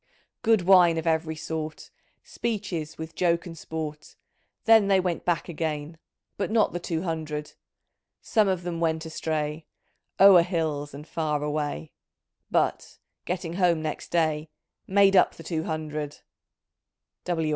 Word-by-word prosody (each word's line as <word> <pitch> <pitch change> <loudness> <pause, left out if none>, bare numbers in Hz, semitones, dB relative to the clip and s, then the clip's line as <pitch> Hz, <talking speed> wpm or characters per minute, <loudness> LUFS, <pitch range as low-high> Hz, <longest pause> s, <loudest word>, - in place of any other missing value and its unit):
' - - -36
' - - -60
Good 220 -3 +4
wme 175 -2 +6
of 160 - -3
every 160 -1 0
sort. 155 0 -5 0.3
Speeches 195 -9 -4
with 160 0 -7
joke 170 -1 +1
and 170 -2 -8
sport; 155 -2 -6 0.5
Then 225 -3 +6
they 195 -1 +4
went 180 -2 -2
back 175 -2 0
again. 160 -1 -4 0.4
But 195 - -1
not 220 -1 +2
the 175 - -2
two 165 -1 -3
hundred. 155 -3 -4 0.7
Some 215 -2 +2
of 185 -2 0
them 170 -1 -3
went 160 -1 0
astray. 155 -1 -3 0.5
O'er 195 -3 +9
hills 160 -5 -2
and 150 +3 -10
far 150 -3 -1
away, 145 - -3 0.6
But, - - 0 0.3
getting 175 -2 -3
home 175 -3 +2
next 155 -1 -4
day. 155 -2 0 0.4
Made 195 0 +5
up 185 - +5
the 165 - -11
two 160 0 -3
hundred." 155 -2 -4
165 Hz, 145 wpm, -26 LUFS, 155-180 Hz, 0.7 s, O'er